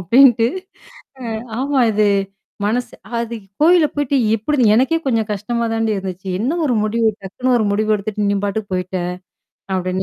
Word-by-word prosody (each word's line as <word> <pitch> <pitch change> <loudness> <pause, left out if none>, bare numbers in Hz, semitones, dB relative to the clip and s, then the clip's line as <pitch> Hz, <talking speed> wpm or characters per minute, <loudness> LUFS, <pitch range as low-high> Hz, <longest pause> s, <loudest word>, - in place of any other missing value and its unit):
அப்படீன்னுட்டு. 235 +4 +5 0.8
அ - - -2 0.3
ஆமா 275 0 +1
இது 210 0 +2 0.6
மனசு 240 +4 -1 0.3
அது 235 0 -3 0.3
"கோயிலப் 330 -2 +5
போயிட்டு 285 -1 +1 0.2
எப்படி 290 +7 -1
இது 215 - +5
எனக்கே 270 +7 +3
கொஞ்சம் 225 -5 0
கஷ்டமாதான்டீ 225 +1 -1
இருந்துச்சு. 190 0 -6
என்ன 280 +10 0
ஒரு 250 -5 +1
முடிவு? 225 +1 +1
டக்குன்னு 250 +7 -1
ஒரு 220 - +1
முடிவு 215 +1 +1
எடுத்துட்டு? 205 0 -2
நீ 200 - +1
பாட்டுக்கு 200 0 -3
போயிட்ட!" 185 +1 -2 0.8
அப்படின்னு, 185 0 -1
225 Hz, 150 wpm, -19 LUFS, 205-255 Hz, 0.8 s, அப்படீன்னுட்டு